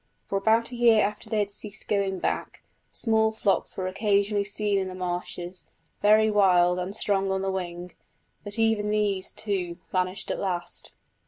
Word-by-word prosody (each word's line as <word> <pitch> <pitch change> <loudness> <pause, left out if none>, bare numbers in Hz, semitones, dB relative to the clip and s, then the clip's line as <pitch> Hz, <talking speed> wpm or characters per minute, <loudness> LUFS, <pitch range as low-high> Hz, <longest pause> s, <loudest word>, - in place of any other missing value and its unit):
For 195 - -1
about 225 +4 +2
a - - -6
year 235 -3 +5
after 210 +1 -4
they 220 - 0
had 205 -1 0
ceased 210 +1 -7
going 195 -2 0
back, - - -3 0.3
small 220 -1 +2
flocks 205 -3 0
were 185 - -2
occasionally 200 +1 +1
seen 205 0 +1
in 190 - -2
the 185 - -7
marshes, 180 0 -5 0.3
very 215 +1 +5
wild 180 -3 +4
and 185 +3 -3
strong 195 -2 0
on 190 0 -1
the 195 - 0
wing, 180 -1 -5 0.5
but 205 +1 -5
even 225 -2 +2
these, 205 -3 0
too, 185 -5 -3
vanished 185 +1 -1
at - - -3
last. 175 -3 -4
200 Hz, 170 wpm, -26 LUFS, 185-210 Hz, 0.5 s, year